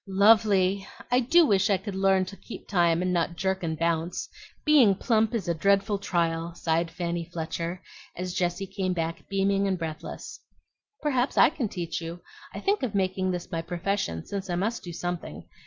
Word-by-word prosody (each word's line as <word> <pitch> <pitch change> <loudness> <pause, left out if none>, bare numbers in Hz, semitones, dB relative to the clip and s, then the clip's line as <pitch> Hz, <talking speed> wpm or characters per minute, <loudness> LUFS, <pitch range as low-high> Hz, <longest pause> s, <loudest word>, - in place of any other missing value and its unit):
"Lovely! 195 -1 +4 0.2
I 250 - +5
do 320 +8 +5
wish 195 -4 +3
I 200 - +4
ever 190 - -6
could 205 -2 -5
learn 190 -1 +3
to 195 - -9
keep 230 - -10
time 175 -3 +2
and 185 0 0
not 170 0 0
jerk 190 +2 -1
and 160 -2 -2
bounce. 165 +1 -1 0.4
Being 270 -10 +6
plump 225 +2 +1
is 205 -7 -2
a 170 - +2
dreadful 200 +4 +2
trial," 170 -3 -1
sighed 165 0 0
Fanny 170 -1 -3
Fletcher, 170 +1 -4 0.3
as 180 0 -4
Jessie 175 +2 -1
came 185 -1 -2
back 165 -1 -4
beaming 195 0 +1
and 190 -1 0
breathless. 160 -2 -6 0.6
"Perhaps 260 -3 0
I - - +7
can 265 -9 -2
teach 175 -2 -4
you. 165 +1 -6 0.3
I - - -6
think 400 +1 +1
of 245 -6 -2
making 185 -1 0
this 180 -1 -4
my 165 - -1
profession 170 - -2
since 195 -1 -5
I 175 - 0
must 215 +6 -1
do 175 - -7
something. 175 0 -5
185 Hz, 190 wpm, -27 LUFS, 170-200 Hz, 0.6 s, I